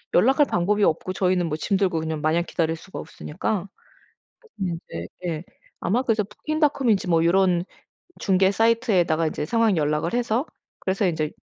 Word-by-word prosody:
연락할 270 - +5
방법이 205 +4 +1
없고 185 +3 +1
저희는 185 -2 +1
뭐 150 - -2
짐 195 +5 0
들고 185 -5 +1
그냥 160 -1 -3
마냥 160 +3 +2
기다릴 165 -1 -1
수가 185 - -11
없으니까 190 +4 -4 0.9
그래서 180 -4 -2
이제 85 +1 -6 0.2
예 160 0 -3 0.4
아마 235 +7 +1
그래서 225 -4 +1
부킹닷컴인지 265 - 0
뭐 165 -1 +3
요런 180 0 +3 0.6
중개 190 -1 +3
사이트에다가 200 -8 +2
이제 150 - -3
상황 225 0 +2
연락을 150 +4 0
해서 240 +3 0 0.3
그래서 195 +1 0
인제 160 -3 0
185 Hz, 365 characters per minute, -24 LUFS, 165-215 Hz, 0.9 s, 연락할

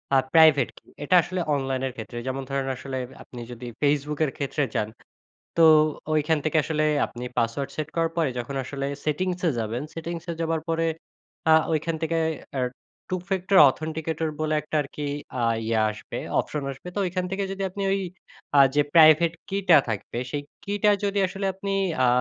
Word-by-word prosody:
আ - - +7 0.2
private 155 -5 +6
key. - - -19
এটা 180 - +3
আসলে 185 +1 -4 0.2
অনলাইনের 135 -1 -2
ক্ষেত্রে 115 +1 -7
যেমন 130 +1 -2
ধরেন, 135 -1 -1
আসলে 130 0 -5 0.3
আপনি 125 - -11
যদি 120 0 -8
Facebook 145 +1 +1
এর 135 - -3
ক্ষেত্রে 145 +1 -1
যান 105 - 0 0.7
তো 165 - +5 0.5
ঐখান 155 +1 +2
থেকে 155 +1 +1
আসলে 155 -1 0 0.2
আপনি 120 +1 -8
পাসওয়ার্ড 115 +4 -1
সেট 155 -1 -3
করার 165 0 +2
পরে 165 -3 +2
যখন 120 +3 -5
আসলে 140 +1 -4 0.2
সেটিংসে 180 +3 0
যাবেন, 115 +4 -2
সেটিংসে 170 +1 -5
যাবার 165 -1 0
পরে 165 0 +1 0.6
আ - - +8 0.2
ওইখান 160 +1 0
থেকে 165 +1 0 0.4
অ্যা 130 -2 -1 0.5
two 185 - 0
factor 190 +1 +1
authenticator 160 +2 -3
বলে 155 0 0
একটা 150 - -3
আর - - -9
কি 145 -1 -3 0.3
আ - - 0 0.2
ইয়া 115 -1 +1
আসবে 105 - -7 0.2
অপশন 150 -2 -5
আসবে। 135 +6 -9
তো - - -3
ঐখান 180 +1 -2
থেকে 195 +1 -1
যদি 195 0 -5
আপনি 200 +2 -5
ঐ - - +2 0.7
আ - - +9
যে 145 - +5
প্রাইভেট 160 +1 +7 0.2
key 195 +1 -1
টা 160 - +10
থাকবে 110 +2 -4
সেই 145 -1 -3 0.2
key 205 0 -2
টা 210 - +7
যদি 200 0 0
আসলে 195 +1 -4
আপনি 195 +1 -5 0.3
আ - - +5
155 Hz, 180 wpm, -25 LUFS, 135-170 Hz, 0.7 s, টা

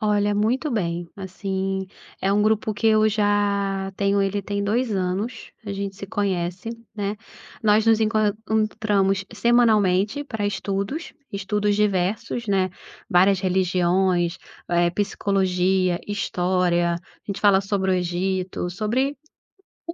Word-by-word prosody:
Olha, 205 -1 +2
muito 235 +8 +1
bem, 175 -6 -2
assim, 190 0 -3 0.3
é 195 - +1
um 205 +1 +3
grupo 215 0 +1
que 225 - -1
eu 215 0 +4
já 200 -2 0
tenho 200 0 +2
ele 200 +1 0
tem 200 +1 -2
2 230 +4 0
anos, 195 +5 -3
a 200 - -4
gente 200 0 -4
se 200 - -8
conhece, 185 0 -2 0.2
né. 205 0 -2 0.5
Nós 215 0 +4
nos 225 -1 +4
encontramos 215 -2 +1
semanalmente 215 +1 +3
pra 220 -7 -4
estudos, 205 - -3 0.2
estudos 205 +1 0
diversos, 210 +3 0
né, 190 -2 +2 0.4
várias 190 +2 +4
religiões, 180 -1 +1 0.3
eh, 175 0 +2
psicologia, 190 -2 +1
história, 180 -3 +1
a - - -4 0.3
gente 200 -1 -4
fala 200 -2 +5
sobre 195 -1 0
o - - +3
Egito, 180 +1 -2
sobre 235 +9 -1 0.7
um 335 - -4
200 Hz, 125 wpm, -23 LUFS, 185-215 Hz, 0.7 s, fala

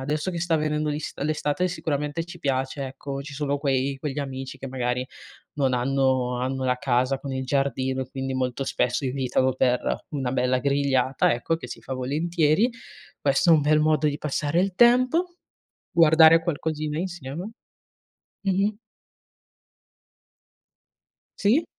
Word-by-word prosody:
adesso 150 +6 -2
che 170 - -4
sta 165 -1 +1
venendo 150 0 -1
l'ist 150 0 -4
l'estate 155 +4 0
sicuramente 150 -1 -2
ci 175 0 -11
piace, 135 -2 -2
ecco, 135 +1 -6
ci 145 0 -9
sono 145 0 -1
quei 135 -1 0
quegli 145 0 -4
amici 135 -1 -5
che 135 - -6
magari 125 0 -2 0.5
non 135 -3 +1
hanno 130 -1 +1
hanno 130 +1 -2
la 125 0 +1
casa 130 +1 +1
con 140 - -6
il 130 0 -3
giardino 130 -1 0
e 130 - -6
quindi 135 0 -4
molto 130 +1 -1
spesso 125 +1 0
invitano 130 0 0
per 125 -1 +2 0.3
una 135 -4 -2
bella 125 0 +1
grigliata, 135 -2 +2
ecco, 120 +7 -1
che 125 - -9
si - - -8
fa 130 - -5
volentieri. 155 - +1 0.5
Questo 140 +4 +2
è - - +9
un 155 - +4
bel 155 +1 +3
modo 155 0 +2
di 145 0 -1
passare 150 +2 -1
il 195 -1 -1
tempo, 255 - +4 0.5
guardare 165 0 +7
qualcosina 155 -1 -2
insieme. 175 +1 -5 0.9
Mh-mh. 200 +2 +1 2.6
Sì. 235 +11 +3
140 Hz, 145 wpm, -25 LUFS, 130-160 Hz, 2.6 s, è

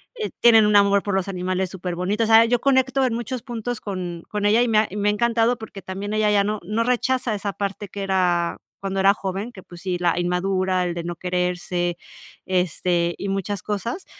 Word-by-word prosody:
eh, 440 -3 -4
tienen 225 -2 +7
un 210 - +3
amor 200 0 +5
por 205 - -2
los 190 -1 0
animales 185 0 -2
superbonito. 185 +3 -2
O - - -3
sea, 225 0 +7
yo 240 +1 +1
conecto 265 0 +2
en 250 - 0
muchos 240 +1 -4
puntos 240 -2 -4
con 180 -4 -5
con 210 -1 -2
ella 220 +3 +4
y - - 0
me 215 -1 +4
ha 215 - +2
y 195 - -9
me 205 0 +2
ha - - +4
encantado 235 +2 +2
porque 215 -3 -9
también 195 +2 -5
ella 215 -1 +2
ya 200 -1 +4
no 210 +1 -2
no 215 +6 -1
rechaza 250 -1 0
esa 200 0 -3
parte 200 +1 -4
que 200 - -6
era 180 -3 +1 0.2
cuando 195 0 -2
era 195 +1 +6
joven, 195 +4 -4
que, 195 - -12
pues 175 -1 -13
sí, 185 -2 -2
la 175 -1 +1
inmadura, 185 +1 0
el 175 - -2
de 170 - -4
no 175 0 -4
quererse, 180 -1 -1 0.5
este, 180 -1 0
y 200 - -4
muchas 195 +1 -2
cosas, 230 - -3
200 Hz, 220 wpm, -23 LUFS, 180-225 Hz, 0.5 s, tienen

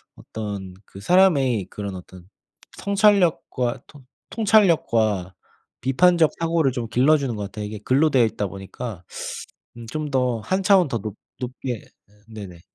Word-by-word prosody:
어떤 100 -4 -7
그 95 - -12
사람의 135 - +3
그런 100 -2 -6
어떤 90 0 -12 0.5
성찰력과 185 - +2
통 145 -4 -16 0.3
통찰력과 115 - +2 0.5
비판적 160 +5 +4
사고를 165 -4 +1
좀 120 -2 -4
길러주는 135 +1 +2
것 105 - -4
같아요. 105 +1 -6
이게 105 +1 -6
글로 140 +7 +3
되어 130 -4 +4
있다 105 -2 -2
보니까 95 +1 -8 0.7
음 115 - -9
좀 155 -1 -4
더 125 -3 +1
한 190 - -1
차원 185 -4 +5
더 115 -4 -2
높 105 0 -6 0.2
높게 130 +1 -6
예 - - -19 0.4
네네. 100 -6 -10
125 Hz, 275 characters per minute, -23 LUFS, 105-160 Hz, 0.7 s, 차원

